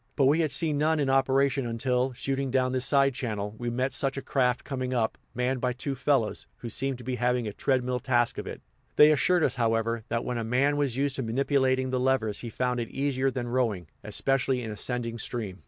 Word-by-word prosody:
But 135 - +3
we 145 +5 +4
had 160 -2 +2
seen 145 +1 0
none 155 +1 +2
in 135 -2 +1
operation 135 -1 +2
until, 125 +2 0
shooting 135 +2 -2
down 130 0 +1
this 130 -1 0
side 140 -1 +4
channel, 105 -5 -3
we 120 -1 -2
met 125 +2 -1
such 135 0 0
a 135 - -4
craft 125 -2 +1
coming 130 -2 -3
up, 110 -2 0 0.2
manned 125 +1 0
by 125 -1 0
two 135 +3 -4
fellows, 130 -4 0
who 120 - -7
seemed 135 +3 -2
to 125 - -11
be 125 +1 -3
having 125 -1 +1
a 105 - -4
treadmill 125 +1 0
task 120 -1 +1
of - - -6
it; - - -7 0.3
they 150 +1 +8
assured 175 +3 +3
us, 125 - +2
however, 115 0 +1
that 115 0 -1
when 125 -1 -2
a - - -2
man 130 +6 +2
was 140 -4 -1
used 140 -1 0
to - - -1
manipulating 130 +1 +1
the 130 - 0
levers 125 -5 +1
he 120 - -6
found 125 +2 -1
it 115 - -3
easier 135 -1 0
than 125 -2 -4
rowing, 115 -8 0 0.2
especially 130 +4 0
in 110 - -5
ascending 115 +2 -3
stream. 105 -5 -4
130 Hz, 220 wpm, -27 LUFS, 120-135 Hz, 0.3 s, they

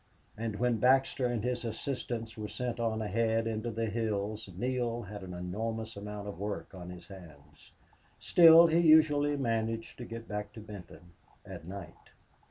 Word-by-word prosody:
And 110 -1 -3
when 120 +2 +1
Baxter 130 +1 +3
and 120 -3 -2
his 125 0 -1
assistants 115 -1 -4
were 105 -1 -5
sent 120 +1 -4
on 110 -1 0
ahead 115 +2 +1
into 115 +1 -2
the 115 0 -2
hills 110 -1 -2
Neale 120 0 -1
had 105 0 -8
an 90 -1 -7
enormous 110 +5 -4
amount 105 0 -6
of 100 -4 -7
work 100 0 -4
on 90 -2 -8
his 90 -1 -10
hands. 85 -7 -14 0.5
Still 165 -1 +8
he 165 0 +3
usually 150 -3 +5
managed 115 -3 -2
to 120 - -5
get 115 0 -8
back 105 -1 -5
to 115 - -9
Benton 90 -5 -11 0.3
at 80 - -9
night. 95 -3 -9
115 Hz, 165 wpm, -31 LUFS, 100-120 Hz, 0.5 s, Still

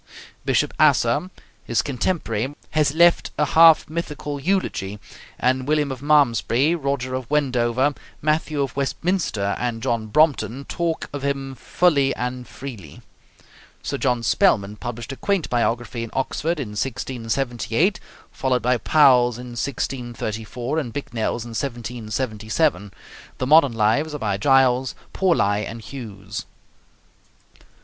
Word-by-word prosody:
Bishop - - +1
Asser, 185 - +3 0.3
his 115 - 0
contemporary, 135 - -2 0.2
has 150 -1 +1
left 170 +1 +4
a 150 - +3
half 160 +2 +6
mythical 150 -3 -4
eulogy, 140 - -1 0.4
and 130 +1 0
William 150 -2 +1
of 130 -1 -6
Malmesbury, 145 -1 +3
Roger 140 -5 -2
of 130 -2 -4
Wendover, 130 -2 +1 0.3
Matthew 150 -1 0
of 135 - -5
Westminster, 140 - -1
and 120 -2 -3
John 115 -4 -1
Brompton 140 0 +2
talk 170 -2 -2
of 145 - -4
him 135 -1 -2
fully 140 +1 +2
and 125 0 -4
freely. 110 - -10 0.8
Sir - - -3
John 125 -2 +1
Spellman 100 +1 +2
published 120 +1 -6
a - - -5
quaint 195 +6 -1
biography 120 0 -1
in 115 - -6
Oxford 155 +5 -1
in 125 -7 -4
1678, 120 - -1 0.3
followed 125 -3 0
by 125 +1 +3
Powell's 125 -6 +4
in 125 0 -8
1634, 120 +1 -3
and 125 -7 -4
Bicknell's 120 -2 -3
in - - -8
1777. 115 - -2 0.5
The 130 - -2
modern 145 -2 +5
lives 115 +8 +1
are - - -2
by 105 -7 -1
Giles, 130 +1 +3 0.2
Pauli, 105 - +2
and 115 - -7
Hughes. 105 -5 -8
130 Hz, 125 wpm, -22 LUFS, 115-145 Hz, 0.8 s, half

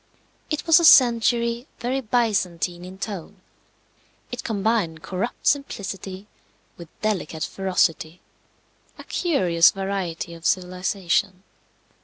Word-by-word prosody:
It 305 -2 -3
was 330 0 +6
a - - -1
century 235 -2 +5
very 255 +3 -2
Byzantine 195 -7 -1
in 185 +1 -10
tone. 200 -2 -7 0.9
It 245 - -5
combined 205 -7 -1
corrupt 195 +6 -4
simplicity 200 -8 -2 0.5
with 170 - -11
delicate 180 -7 -2
ferocity 180 -3 -1 0.8
a - - -10
curious 180 - +3
variety 190 -4 -4
of 165 -1 -12
civilization. 185 +1 -1
195 Hz, 100 wpm, -23 LUFS, 180-235 Hz, 0.9 s, was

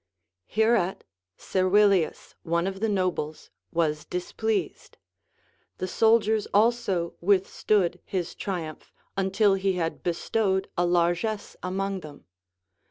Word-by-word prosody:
Hereat 220 -4 +1 0.3
Servilius, 190 -1 +2
one 170 0 0
of 190 0 -3
the 220 +1 0
nobles, 180 -6 -2 0.2
was 155 -3 0
displeased; 215 +4 -3 0.8
the 185 - -3
soldiers 220 +1 +3
also 205 -6 +2
Λvithstood 190 -1 +2
his 180 -3 -3
triumph, 170 -6 -5 0.2
until 195 +1 +3
he 195 0 +1
had 165 -2 -2
bestowed 190 +2 0
a 175 0 +2
largess 175 +5 0
among 195 +1 -2
them. 150 -4 -12
190 Hz, 100 wpm, -26 LUFS, 175-205 Hz, 0.8 s, soldiers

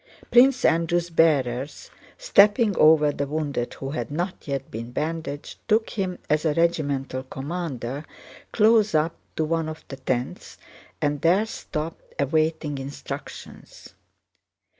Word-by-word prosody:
Prince 255 +2 +5
Andrew's 170 +1 +2
bearers, 140 -5 +1 0.3
stepping 210 - +4
over 155 -1 +6
the 140 0 -3
wounded 145 -5 -2
who 135 0 -5
had 155 - -3
not 175 +5 -4
yet 140 -1 -3
been 115 +2 -6
bandaged, 155 0 -4
took 220 +1 +2
him, 185 -3 -2
as 150 0 +1
a 155 -3 +1
regimental 140 -6 0
commander, 135 -1 -5 0.5
close 215 -4 +4
up 155 +2 +2 0.2
to 160 - 0
one 165 0 -1
of 155 - -8
the 135 - -7
tents 130 -2 -3 0.5
and 145 -1 0
there 180 +7 +4
stopped, 160 -7 -6
awaiting 155 0 0
instructions. 135 +2 -9
155 Hz, 125 wpm, -24 LUFS, 140-175 Hz, 0.5 s, over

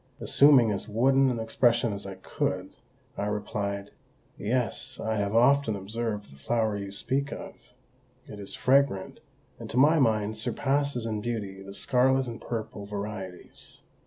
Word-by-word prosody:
Assuming 135 -6 +5
as 105 +2 -3
wooden 135 +5 +4
an 120 -2 -1
expression 115 0 +2
as 100 0 -6
I 95 - -6
could, 95 - -3 0.5
I 100 - -1
replied, 100 -1 -3 0.4
"Yes, 125 +3 -2
I 110 0 -1
have 100 +1 -1
often 125 -1 +4
observed 105 -1 -4
the 70 - -17
flower 110 +6 0
you 100 -1 -5
speak 135 +7 -1
of; - - -7 0.7
it 105 - -9
is 100 - -6
fragrant, 130 -7 +2 0.4
and - - -8
to - - -3
my 155 +5 +6
mind 110 -4 +2
surpasses 135 +2 0
in 110 -2 -2
beauty 105 -4 -4
the 100 0 -10
scarlet 130 +5 +2
and 115 -2 -7
purple 110 -3 -5
varieties. 100 -3 -6
110 Hz, 150 wpm, -28 LUFS, 100-125 Hz, 0.7 s, my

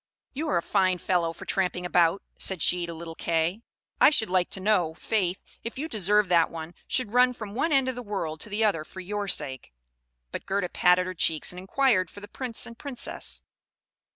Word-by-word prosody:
"You 305 +4 -3
are 175 - +2
a 170 - 0
fine 185 -2 +2
fellow 175 -1 0
for - - -10
tramping 180 -2 0
about," 175 +1 +3
said 190 -4 -1
she 175 -1 +2
to 170 - -5
little 165 0 -7
Kay; 165 +5 0 0.4
"I - - +8
should 225 -10 +1
like 185 -1 +2
to - - -1
know, 185 -5 +2
faith, 190 -1 -1 0.2
if 230 +3 -6
you 300 +4 -3
deserve 210 - +2
that 170 -2 +4
one 165 +1 -7
should 230 -4 -1
run 250 0 +5
from 215 -4 -8
one 315 +8 0
end 270 -2 +3
of 260 - 0
the 245 - -6
world 190 -8 -4
to 215 - -5
the 215 +2 +1
other 165 -7 +1
for 190 - -11
your 205 +2 -3
sake?" 130 - -1 0.6
But - - -6
Gerda 195 -2 0
patted 180 +1 +4
her 185 - -4
cheeks, 160 -2 +2
and 180 - -7
inquired 190 -2 +2
for - - -11
the 205 - -10
Prince 240 +1 -5
and 235 - -10
Princess. 280 -4 -3
190 Hz, 210 wpm, -27 LUFS, 175-220 Hz, 0.6 s, I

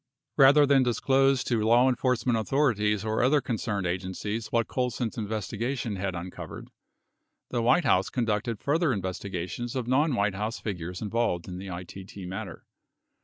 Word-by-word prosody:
60 - - +4
Rather 145 +2 +7
than 140 -1 +4
disclose 135 +2 +2
to 115 -3 0
law 120 +4 +5
enforcement 125 -1 +1
authorities 110 -4 +1
or 110 0 0
other 135 +4 +4
con 120 -4 -3
cerned 100 -5 -2
agencies 95 +5 -3
what 115 -2 +1
Colson's 125 -2 -2
investigation 110 +1 -3
had 95 -1 -2
uncovered, 90 +1 -7 0.8
the 120 - 0
White 125 +8 +3
House 95 -6 +3
conducted 115 -2 -1
further 150 0 +1
investigations 95 +4 -4
of 125 -3 -2
non 140 +3 +2
White 100 -2 +1
House 105 +4 -3
figures 90 -2 -5
involved 105 -5 -1
in 90 -1 -6
the 95 - -7
ITT 95 +1 -8
matter. 100 +2 -7
110 Hz, 155 wpm, -27 LUFS, 100-125 Hz, 0.8 s, Rather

